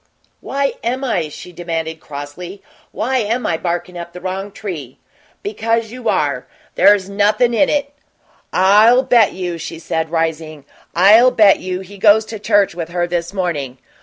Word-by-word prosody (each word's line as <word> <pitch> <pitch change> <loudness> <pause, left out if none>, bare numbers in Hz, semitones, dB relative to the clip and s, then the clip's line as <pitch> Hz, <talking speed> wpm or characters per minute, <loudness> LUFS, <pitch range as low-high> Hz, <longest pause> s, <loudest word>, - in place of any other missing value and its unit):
"Why 275 0 -2
am 255 +3 -2
I?" 175 - -1
she 180 - -10
demanded, 165 -2 -4
crossly. 155 +7 -9 0.3
"Why 255 +5 -1
am 230 +3 -1
I 165 - +1
barkin' 175 +1 -3
up 170 0 -8
the 180 - -8
wrong 190 +2 -5
tree?" 165 - -7 0.5
"Because 230 - -1
you 245 -2 -4
are. 140 -4 -1 0.3
There's 200 -2 +4
nothin' 210 +4 +2
in 280 +5 +3
it." 285 -1 -1 0.6
"I'll 210 +7 +5
bet 240 -5 +4
you," 175 -2 -4
she 165 +1 -6
said, 160 0 -3
rising 160 -3 -3 0.3
"I'll 210 +8 +7
bet 210 -5 +4
you 185 0 -4
he 195 +1 -12
goes 215 +1 +5
to 220 -1 -8
church 205 -2 +2
with 170 -1 -5
her 175 0 -1
this 175 0 -3
morning. 160 -10 -3
190 Hz, 165 wpm, -18 LUFS, 170-220 Hz, 0.6 s, I'll